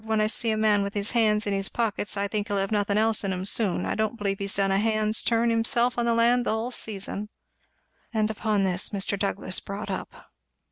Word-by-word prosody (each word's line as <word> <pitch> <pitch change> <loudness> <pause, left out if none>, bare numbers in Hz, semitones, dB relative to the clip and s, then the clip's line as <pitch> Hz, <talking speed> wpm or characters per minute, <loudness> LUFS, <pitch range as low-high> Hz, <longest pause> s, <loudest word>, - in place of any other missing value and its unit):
When 220 0 0
I 215 - +3
see 225 +2 0
a 220 - 0
man 215 -1 +3
with 200 +1 -4
his 205 +1 0
hands 215 -3 +2
in 205 - -1
his 195 0 0
pockets, 210 -3 -1
I 200 0 0
think 210 0 -3
he'll 205 -1 -2
have 195 +1 -1
nothin' 205 -1 +1
else 220 0 +3
in 195 - -1
'em 185 0 -3
soon. 200 -2 +1
I - - -1
don't 220 +2 -2
believe 200 -2 -2
he's 200 0 -1
done 195 -1 +1
a 195 - +2
hand's 215 0 +1
turn 230 0 +2
himself 235 +2 +2
on 240 - 0
the 230 - +2
land 240 +1 +3
the - - -2
hull 220 +3 -2
season!" 210 -2 -2 0.8
And 220 -1 0
upon 215 -2 0
this 185 0 +1
Mr. 200 0 0
Douglass 195 -2 -2
brought 200 +1 -6
up. - - -8
210 Hz, 235 wpm, -25 LUFS, 200-225 Hz, 0.8 s, I